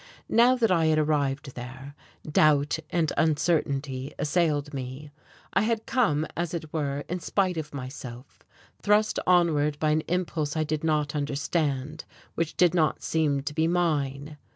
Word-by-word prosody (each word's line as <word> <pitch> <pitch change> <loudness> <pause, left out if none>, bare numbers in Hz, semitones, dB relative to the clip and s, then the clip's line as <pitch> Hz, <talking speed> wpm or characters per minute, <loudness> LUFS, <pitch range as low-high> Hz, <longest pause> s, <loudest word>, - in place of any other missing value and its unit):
Now 240 +3 +5
that 230 -5 +2
I 165 -3 +3
had 155 -1 +3
arrived 145 -3 0
there, 130 +3 -8 0.3
doubt 150 0 +3
and 165 -3 0
uncertainty 145 -4 0
assailed 150 -1 0
me. 135 +2 -6 0.4
I - - +3
had 225 0 0
come 180 - +1
as 170 0 -2
it 160 -2 -6
were 145 -3 -1
in 180 +1 -3
spite 185 +1 0
of 155 -2 -5
myself, 130 -2 -8 0.4
thrust 210 +1 +2
onward 155 -5 +3
by 155 0 +1
an 155 +1 +2
impulse 165 -4 -1
I 155 - +2
did 155 0 -3
not 150 -2 0
understand, 145 0 -2 0.3
which 165 -1 -3
did 180 -2 +4
not 160 -3 +1
seem 150 -4 +1
to 145 +1 -4
be 160 +1 +1
mine. 150 -4 -1
155 Hz, 155 wpm, -27 LUFS, 145-170 Hz, 0.4 s, Now